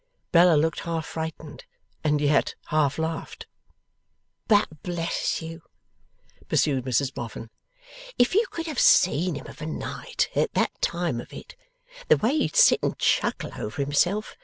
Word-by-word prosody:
Bella 175 Hz, -1 st, +6 dB
looked 160 Hz, +1 st, +1 dB
half 165 Hz, -1 st, -3 dB
frightened, 160 Hz, -2 st, -7 dB, 0.4 s
and 150 Hz, -1 st, +2 dB
yet 145 Hz, 0 st, +2 dB
half 150 Hz, -3 st, +1 dB
laughed. 160 Hz, 0 st, -4 dB, 1.0 s
'But, 205 Hz, -, +2 dB
bless 170 Hz, -1 st, -2 dB
you,' 165 Hz, 0 st, -8 dB, 0.9 s
pursued 135 Hz, -4 st, +1 dB
Mrs 130 Hz, +1 st, 0 dB
Boffin, 115 Hz, -1 st, -7 dB, 0.7 s
'if 245 Hz, +6 st, +3 dB
you 435 Hz, +5 st, +3 dB
could 330 Hz, -1 st, -5 dB
have 310 Hz, -6 st, -3 dB
seen 175 Hz, -1 st, +4 dB
him 140 Hz, -, -8 dB
of 150 Hz, -, -12 dB
a 155 Hz, -, -4 dB
night, 160 Hz, -, -3 dB
at -, -, 0 dB
that -, -, +2 dB
time 170 Hz, -8 st, -1 dB
of -, -, -14 dB
it! -, -, -11 dB, 0.5 s
The -, -, +5 dB
way 235 Hz, +7 st, +1 dB
he'd 155 Hz, -, 0 dB
sit -, -, +6 dB
and -, -, -2 dB
chuckle -, -, 0 dB
over 105 Hz, +6 st, -6 dB
himself! 175 Hz, +9 st, 0 dB
160 Hz, 150 wpm, -25 LUFS, 145-175 Hz, 1.0 s, Bella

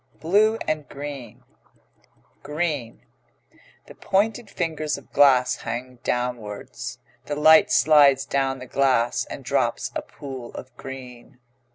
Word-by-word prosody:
BLUE 210 Hz, +7 st, +3 dB, 0.2 s
& 150 Hz, -, -18 dB
GREEN 140 Hz, -5 st, -8 dB, 1.0 s
GREEN 150 Hz, -6 st, -3 dB, 0.8 s
The -, -, -13 dB
pointed 210 Hz, +3 st, 0 dB
fingers 160 Hz, -5 st, -2 dB
of -, -, -16 dB
glass 130 Hz, -3 st, +5 dB
hang 125 Hz, +1 st, -6 dB
downwards. 120 Hz, -4 st, -4 dB, 0.3 s
The 145 Hz, -, -3 dB
light 160 Hz, +7 st, +6 dB
slides 140 Hz, -3 st, +5 dB
down 135 Hz, -1 st, 0 dB
the 130 Hz, -, -9 dB
glass, 130 Hz, -3 st, +1 dB
and -, -, -9 dB
drops -, -, 0 dB
a -, -, -1 dB
pool 130 Hz, -4 st, -9 dB
of 130 Hz, -, -10 dB
green. 125 Hz, -3 st, -10 dB
140 Hz, 115 wpm, -24 LUFS, 125-155 Hz, 1.0 s, light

